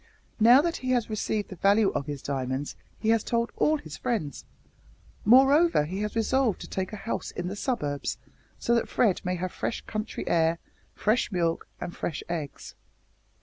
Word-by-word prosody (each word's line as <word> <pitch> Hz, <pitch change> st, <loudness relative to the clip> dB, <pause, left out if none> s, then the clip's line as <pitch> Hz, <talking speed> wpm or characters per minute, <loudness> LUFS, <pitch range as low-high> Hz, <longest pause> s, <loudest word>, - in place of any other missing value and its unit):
Now 240 Hz, +5 st, +8 dB
that 335 Hz, 0 st, -1 dB
he 255 Hz, -, -5 dB
has 235 Hz, -3 st, 0 dB
received 215 Hz, 0 st, -2 dB
the 190 Hz, -, -7 dB
value 200 Hz, +3 st, +4 dB
of 140 Hz, 0 st, -3 dB
his 145 Hz, -2 st, -5 dB
diamonds 135 Hz, 0 st, -3 dB, 0.2 s
he 220 Hz, -, -1 dB
has 225 Hz, -1 st, +3 dB
told 235 Hz, 0 st, 0 dB
all 310 Hz, +1 st, +3 dB
his 155 Hz, -, -9 dB
friends. 210 Hz, -, -3 dB, 0.8 s
Moreover, 270 Hz, -, +6 dB
he 185 Hz, +6 st, -4 dB
has 210 Hz, +1 st, -3 dB
resolved 230 Hz, -1 st, +1 dB
to -, -, -7 dB
take 190 Hz, 0 st, -3 dB
a -, -, -5 dB
house 220 Hz, +2 st, -4 dB
in 175 Hz, 0 st, -4 dB
the 195 Hz, -, -5 dB
suburbs, 195 Hz, -, -2 dB, 0.4 s
so 235 Hz, -, 0 dB
that 235 Hz, -, +1 dB
Fred 210 Hz, -7 st, +2 dB
may 180 Hz, 0 st, -1 dB
have 180 Hz, 0 st, -3 dB
fresh -, -, -3 dB
country 215 Hz, 0 st, -5 dB
air, 165 Hz, 0 st, +3 dB, 0.4 s
fresh 220 Hz, +3 st, +1 dB
milk, 170 Hz, -3 st, 0 dB
and 175 Hz, -, -6 dB
fresh 160 Hz, -, -4 dB
eggs. 160 Hz, -5 st, -5 dB
205 Hz, 180 wpm, -27 LUFS, 165-235 Hz, 0.8 s, Now